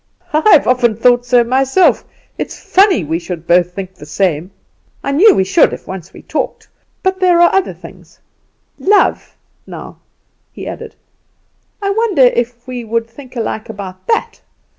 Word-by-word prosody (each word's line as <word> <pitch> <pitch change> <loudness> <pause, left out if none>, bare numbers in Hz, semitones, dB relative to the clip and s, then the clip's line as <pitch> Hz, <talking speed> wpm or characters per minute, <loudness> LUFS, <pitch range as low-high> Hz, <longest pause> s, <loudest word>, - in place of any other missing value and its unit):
"I've 310 +1 +5
often 245 -3 +2
thought 245 +2 +2
so 245 -1 +4
myself. 265 +8 +2 0.3
It's - - -6
funny 380 - +3
we 160 +2 -2
should 170 -1 -7
both 175 +1 +3
think 190 -1 -6
the 150 - -13
same; 170 +1 -1 0.5
I 275 - -2
knew 390 +10 +5
we 190 - +2
should 190 - +3
if - - -8
once 190 -3 -8
we - - -14
talked. - - -4 0.4
But 375 0 0
there 360 -2 +3
are 345 - +5
other 385 -1 0
things - - -15 0.6
love, 410 +2 +1 0.3
now," - - -10 0.5
he - - -9
added. - - -8 0.9
"I 395 - 0
wonder 405 - +2
if 240 -1 +1
we 250 -1 -5
would 230 +1 -2
think 255 +2 -14
alike 220 -2 -4
about 195 -3 -9
that. 455 - -1
245 Hz, 160 wpm, -15 LUFS, -, 0.9 s, I've